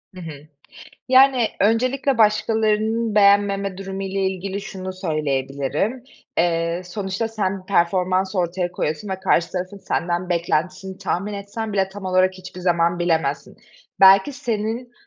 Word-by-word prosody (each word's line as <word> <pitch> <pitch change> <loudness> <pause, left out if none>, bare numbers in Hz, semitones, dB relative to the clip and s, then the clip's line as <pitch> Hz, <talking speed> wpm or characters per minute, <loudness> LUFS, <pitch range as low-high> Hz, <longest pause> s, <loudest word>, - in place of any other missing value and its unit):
Hı 180 - -9
hı. 150 -2 -9 0.6
Yani, 260 -3 +5
öncelikle 255 +5 +2
başkalarının 220 +1 +2
beğenmeme 200 -1 +3
durumu 195 0 -5
ile 195 0 -3
ilgili 190 +1 -2
şunu 185 -1 -6
söyleyebilirim: 150 - -2 0.3
Eee, 170 +1 +1
sonuçta, 195 +4 -3
sen 195 -4 -3
performans 185 +1 +1
ortaya 175 0 -1
koyuyorsun 155 +3 -3
ve 190 0 -4
karşı 175 -2 +1
tarafın 185 +2 -4
senden 175 0 -2
beklentisini 180 +2 -1
tahmin 195 +1 -2
etsen 205 +2 -5
bile 195 -1 +1
tam 195 0 -10
olarak 185 0 +2
hiçbir 185 -1 -10
zaman 170 -1 +1
bilemezsin. 160 -5 -1 0.4
Belki 195 +6 +7
senin 235 -2 -3
190 Hz, 125 wpm, -22 LUFS, 175-210 Hz, 0.6 s, Belki